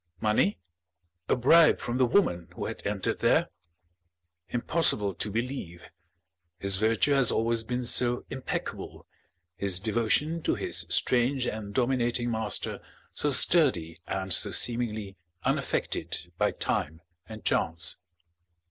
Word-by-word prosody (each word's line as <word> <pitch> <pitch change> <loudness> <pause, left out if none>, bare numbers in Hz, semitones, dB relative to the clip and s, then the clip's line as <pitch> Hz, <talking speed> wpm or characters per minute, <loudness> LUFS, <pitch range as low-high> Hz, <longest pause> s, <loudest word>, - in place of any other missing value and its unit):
Money? 105 -2 +1 0.7
A - - +4
bribe 155 +6 +5
from 120 +2 -3
the 130 - +4
woman 90 - +1
who - - -4
had - - -6
entered - - -2
there? - - +2 1.0
Impossible 120 - +2
to 90 - -4
believe, 110 -7 -5 0.7
his 100 +1 +2
virtue 110 +6 +2
has 135 -4 +3
always 115 0 +1
been 125 +2 -4
so 120 0 +2
impeccable, 130 -1 -5 0.5
his 95 -1 0
devotion 120 - 0
to - - 0
his - - -1
strange 125 +1 +2
and 105 -3 -5
dominating 120 -1 0
master 110 -2 -2 0.3
so 150 - +1
sturdy 120 - +3
and 95 -1 -2
so - - +4
seemingly 110 -5 -1 0.3
unaffected 90 +1 -2
by - - +1
time 80 +3 -3 0.3
and 110 -1 -10
chance! 85 +1 0
115 Hz, 120 wpm, -28 LUFS, 100-125 Hz, 1.0 s, bribe